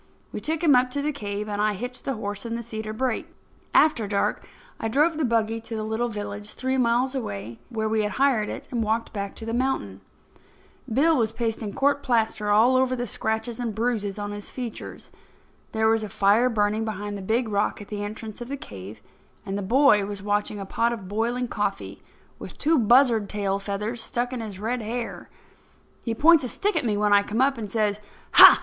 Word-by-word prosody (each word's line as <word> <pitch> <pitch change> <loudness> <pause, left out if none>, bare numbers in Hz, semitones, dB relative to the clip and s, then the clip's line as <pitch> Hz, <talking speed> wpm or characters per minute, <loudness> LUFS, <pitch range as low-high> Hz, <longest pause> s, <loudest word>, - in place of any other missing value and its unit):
We - - -5
took 320 +1 -2
him 305 -4 +6
up 250 0 +4
to 285 +2 -2
the 300 - +1
cave 210 -6 -4
and 205 0 -2
I 210 0 +2
hitched 245 +5 -6
the 270 - -1
horse 205 -2 -4
in 230 -1 -3
the 235 - -4
cedar 220 -1 -5
brake. 255 +6 -1 0.4
After 245 -9 +4
dark 200 -1 -1 0.3
I 225 - -1
drove 300 +8 +3
the 310 - -1
buggy 225 -2 +1
to 230 0 -7
the 215 - -3
little 220 +2 -1
village, 205 -1 -6
three 260 0 -1
miles 250 +1 +2
away, 115 - -5
where 220 -3 -2
we 220 0 +1
had 210 0 -1
hired 260 -6 +2
it, - - -6
and 240 -2 -1
walked 220 +2 -1
back 200 -2 -4
to 225 - -8
the 225 - -3
mountain. 235 - -1 0.9
Bill 310 +8 +4
was 225 -5 +1
pasting 225 -2 -3
court 280 +1 +2
plaster 225 -5 0
over 255 +4 +4
the 245 -1 -2
scratches 220 +1 -2
and 230 -4 -3
bruises 220 -4 -1
on 205 0 -4
his 205 0 -6
features. 245 -3 -7 0.6
There 220 0 +2
was 225 0 +3
a 210 - -5
fire 205 +6 +3
burning 215 -1 +1
behind 205 -1 -4
the 200 - -6
big 225 +5 0
rock 205 -1 0
at 205 - -10
the 205 -1 -4
entrance 215 +2 -7
of 240 - -5
the 280 +2 -4
cave, 105 - -10 0.4
and 195 -1 -3
the 205 - -2
boy 225 0 +4
was 200 -1 -6
watching 205 0 -1
a 195 - -5
pot 230 +4 0
of 205 -5 -7
boiling 235 +5 -1
coffee, - - -3 0.4
with - - -9
two 310 0 +3
buzzard 235 -2 +4
tail 200 -1 -1
feathers 210 +4 -3
stuck 245 +2 -2
in 245 - -3
his 210 -4 -6
red 230 +5 -2
hair. 230 +2 -5 0.7
He 230 -2 -2
points 320 +3 +6
a - - -1
stick 400 - -1
at 315 -5 +1
me 210 -3 +1
when 210 0 +3
I 200 - +7
come 210 +3 -3
up, 270 -1 +3
and 210 -2 -5
says: 210 -1 0 0.3
"Ha! - - +10
225 Hz, 210 wpm, -25 LUFS, 205-250 Hz, 0.9 s, Ha